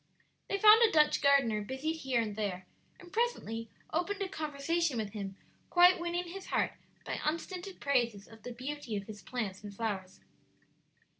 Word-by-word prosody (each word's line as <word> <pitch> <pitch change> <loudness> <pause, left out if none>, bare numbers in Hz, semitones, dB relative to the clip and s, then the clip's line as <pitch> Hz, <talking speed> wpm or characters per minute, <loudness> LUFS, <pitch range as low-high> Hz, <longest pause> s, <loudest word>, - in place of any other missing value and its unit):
They 400 - 0
found 430 +3 +8
a 455 -2 +6
Dutch 300 -1 +4
gardener 275 -7 +4
busied 265 +9 -3
here 265 -5 0
and 215 -3 -2
there, 195 -4 -3 0.3
and 350 -1 -14
presently 230 - -1 0.2
opened 390 +5 0
a - - -2
conversation 310 -2 -1
with 215 -2 -2
him, 195 -2 -5 0.3
quite 355 +1 +6
winning 345 +1 -1
his 385 +2 -8
heart - - +1 0.3
by - - -3
unstinted 360 +4 -3
praises 235 -7 0
of 225 -1 -15
the 245 - -7
beauty 255 -1 -5
of 200 - -5
his 210 0 -9
plants 210 -6 -4
and 205 - -7
flowers. 195 -3 -4
275 Hz, 165 wpm, -32 LUFS, 215-345 Hz, 0.3 s, found